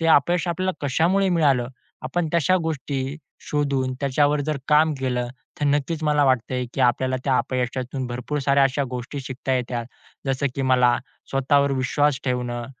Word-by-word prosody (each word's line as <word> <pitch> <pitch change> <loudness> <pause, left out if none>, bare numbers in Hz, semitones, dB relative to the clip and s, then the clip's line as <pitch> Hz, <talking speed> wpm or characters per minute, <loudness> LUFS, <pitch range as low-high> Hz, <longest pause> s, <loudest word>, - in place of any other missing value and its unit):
ते 165 - +1
अपयश 170 +3 +3
आपल्याला 185 +2 0
कशामुळे 180 +8 +2
मिळालं, 140 -9 +2 0.3
आपण 165 +5 -1
तशा 170 +3 +3
गोष्टी 140 -3 -3 0.3
शोधून 140 -3 0
त्याच्यावर 145 +1 +2
जर 150 +1 -1
काम 155 +1 +5
केलं, 125 -2 -1 0.3
तर - - +1
नक्कीच 145 +3 0
मला 150 -1 +3
वाटतंय 125 -1 +1
की - - -2
आपल्याला 130 +1 +2
त्या 135 -2 +2
अपयशातून 130 +1 -2
भरपूर 125 +4 -3
साऱ्या 140 0 +3
अशा 135 +1 +1
गोष्टी 125 +3 -5
शिकता 130 0 -4
येतात. 120 -2 -2 0.4
जसं 135 +1 0
की 135 - -2
मला 125 -2 +4 0.3
स्वतःवर 140 +1 +2
विश्वास 135 +2 +1
ठेवणं, 125 -2 -2
135 Hz, 155 wpm, -23 LUFS, 130-150 Hz, 0.4 s, काम